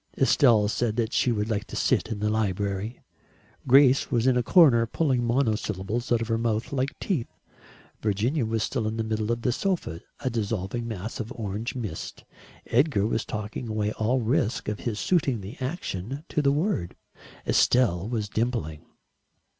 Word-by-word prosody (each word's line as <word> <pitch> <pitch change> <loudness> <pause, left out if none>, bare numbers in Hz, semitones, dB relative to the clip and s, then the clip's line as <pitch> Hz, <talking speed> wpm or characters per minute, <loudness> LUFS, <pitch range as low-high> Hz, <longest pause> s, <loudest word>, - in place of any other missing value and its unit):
Estelle 120 -6 +4
said 110 +1 -1
that 115 -1 -1
she 125 - +2
would 105 -2 -1
like 105 -3 -1
to - - -9
sit - - +1
in 110 - -2
the 105 - +1
library. 100 +1 -2 0.7
Grace 135 +1 +6
was 120 -2 +1
in 130 -1 +4
a 125 - +3
corner 120 -4 +5
pulling 130 -2 +1
monosyllables 115 -2 -1
out 120 -1 +3
of - - -6
her 115 0 0
mouth 115 +2 -1
like 135 0 -1
teeth. 160 - -1 0.7
Virginia 110 +8 0
was 110 0 -1
still 115 -5 -1
in 110 +1 -3
the 115 - 0
middle 110 0 -1
of 120 0 -2
the 125 - +2
sofa, 160 - -2 0.2
a 130 - 0
dissolving 115 0 -2
mass 110 0 -5
of 115 -1 -5
orange 110 +2 -4
mist. 115 -6 -6 0.4
Edgar 120 -4 +2
was 115 0 0
talking 110 +3 -5
away 105 -1 -1
all 115 +5 0
risk 125 +1 0
of 105 -1 -2
his 110 -3 -3
suiting 140 - +1
the 100 +7 -8
action 130 - -4
to 150 - 0
the 140 -1 +3
word. 145 - -1 0.5
Estelle 110 -6 +3
was 110 -4 -2
dimpling. 110 -9 -2
115 Hz, 170 wpm, -26 LUFS, 105-130 Hz, 0.7 s, Grace